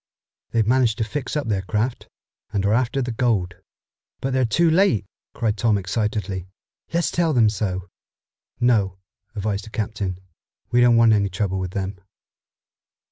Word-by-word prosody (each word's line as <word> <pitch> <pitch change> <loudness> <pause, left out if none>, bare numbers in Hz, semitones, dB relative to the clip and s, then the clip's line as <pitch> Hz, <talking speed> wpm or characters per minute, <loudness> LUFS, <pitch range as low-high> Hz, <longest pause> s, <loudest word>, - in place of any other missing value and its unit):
They've 115 -2 +1
managed 120 -2 +3
to - - 0
fix 135 +6 -3
up 145 - -2
their 100 -3 0
craft 110 +6 -2 0.4
and 100 -2 0
are 100 - +3
after 130 +3 +1
the 120 - -3
gold." 115 -6 0 0.7
"But 135 0 -2
they're 130 -1 +3
too 170 +10 +3
late!" 160 - +3 0.3
cried 110 -3 0
Tom 110 -1 +2
excitedly. 100 -1 -2 0.4
"Let's 170 0 +1
tell 170 -2 +1
them 115 -4 +5
so." 95 -3 -3 0.7
"No," 105 -7 +2 0.4
advised 100 0 -2
the - - -10
captain. 105 -4 -3 0.5
"We 120 - +4
don't 120 -1 +6
want 115 -1 +6
any 100 -2 +2
trouble 95 0 -1
with 95 -1 -3
them." 95 0 -3
110 Hz, 155 wpm, -23 LUFS, 100-120 Hz, 0.7 s, don't